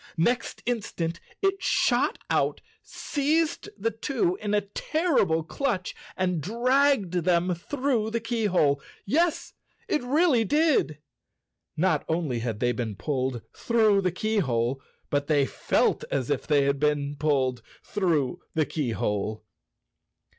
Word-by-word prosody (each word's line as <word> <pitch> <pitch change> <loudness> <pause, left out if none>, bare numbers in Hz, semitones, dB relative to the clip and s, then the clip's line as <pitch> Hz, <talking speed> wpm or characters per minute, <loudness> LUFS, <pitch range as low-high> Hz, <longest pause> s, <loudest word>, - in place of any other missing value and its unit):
Next 235 +9 0
instant 175 -8 -2 0.2
it 390 0 +1
shot - - +2
out, - - +1 0.2
seized 310 +3 -1
the 225 +3 -1
two 295 - -1
in 210 0 0
a 205 - +3
terrible 205 - 0
clutch, 195 - -2 0.2
and 180 -3 0
dragged 245 - +2
them 175 0 +2
through 245 - -1
the 230 +1 -1
keyhole. 205 - +1 0.2
Yes, 325 - +1 0.3
it 310 -8 +1
really 270 -1 +3
did! 295 - +2 0.8
Not 160 -2 +2
only 160 -7 0
had 115 -3 -3
they 120 0 +2
been 115 -4 -3
pulled 130 -2 -2
through 220 -4 +3
the 185 -2 +1
keyhole, 135 - 0 0.3
but 145 0 0
they 145 -3 +3
felt - - +1
as 135 0 -1
if 140 - -1
they 145 -2 +4
had 140 0 +1
been 145 -1 0
pulled 135 -4 0 0.2
through 165 -10 0 0.2
the 155 -1 +2
key¬ 140 -8 -2
hole. 105 +1 -2
180 Hz, 130 wpm, -26 LUFS, -, 0.8 s, they